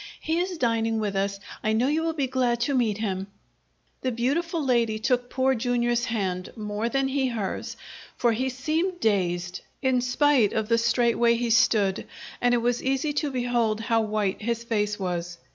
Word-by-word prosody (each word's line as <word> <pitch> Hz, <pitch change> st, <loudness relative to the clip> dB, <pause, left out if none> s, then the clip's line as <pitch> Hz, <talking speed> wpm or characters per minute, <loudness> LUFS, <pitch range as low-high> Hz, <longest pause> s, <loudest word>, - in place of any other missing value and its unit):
"He 320 Hz, +2 st, -1 dB
is 360 Hz, 0 st, -2 dB
dining 225 Hz, -3 st, +1 dB
with 205 Hz, -2 st, -2 dB
us. 200 Hz, 0 st, -1 dB, 0.2 s
I 215 Hz, -, +1 dB
know 225 Hz, +3 st, +2 dB
you 305 Hz, +3 st, +1 dB
will 325 Hz, 0 st, -1 dB
be 290 Hz, -4 st, 0 dB
glad 250 Hz, -2 st, 0 dB
to 275 Hz, +4 st, +1 dB
meet 230 Hz, -6 st, +1 dB
him." 195 Hz, -3 st, -2 dB, 0.7 s
The 260 Hz, -, -1 dB
beautiful 295 Hz, +7 st, -1 dB
lady 235 Hz, -4 st, +2 dB
took 245 Hz, +2 st, 0 dB
Poor 265 Hz, +1 st, +2 dB
Jr.'s 240 Hz, 0 st, 0 dB
hand, 190 Hz, -6 st, -2 dB
more 210 Hz, +1 st, -3 dB
than 270 Hz, +2 st, +1 dB
he 270 Hz, -1 st, +1 dB
hers, 220 Hz, -6 st, -4 dB, 0.4 s
for 240 Hz, -, +3 dB
he 255 Hz, +4 st, 0 dB
seemed 320 Hz, +8 st, -1 dB
dazed, 180 Hz, -, 0 dB, 0.2 s
in 260 Hz, -2 st, +2 dB
spite 250 Hz, -3 st, +3 dB
of 220 Hz, 0 st, -1 dB
the 230 Hz, 0 st, +4 dB
straight 235 Hz, 0 st, +2 dB
way 235 Hz, 0 st, +4 dB
he 235 Hz, 0 st, -1 dB
stood, 215 Hz, -5 st, +3 dB, 0.3 s
and 245 Hz, 0 st, +3 dB
it 235 Hz, -, 0 dB
was 240 Hz, 0 st, +1 dB
easy 270 Hz, +3 st, 0 dB
to 295 Hz, 0 st, 0 dB
behold 240 Hz, -4 st, 0 dB
how 225 Hz, 0 st, +1 dB
white 210 Hz, -2 st, -1 dB
his 235 Hz, +1 st, -2 dB
face 210 Hz, -3 st, -1 dB
was. 175 Hz, -2 st, -3 dB
235 Hz, 185 wpm, -26 LUFS, 215-260 Hz, 0.7 s, the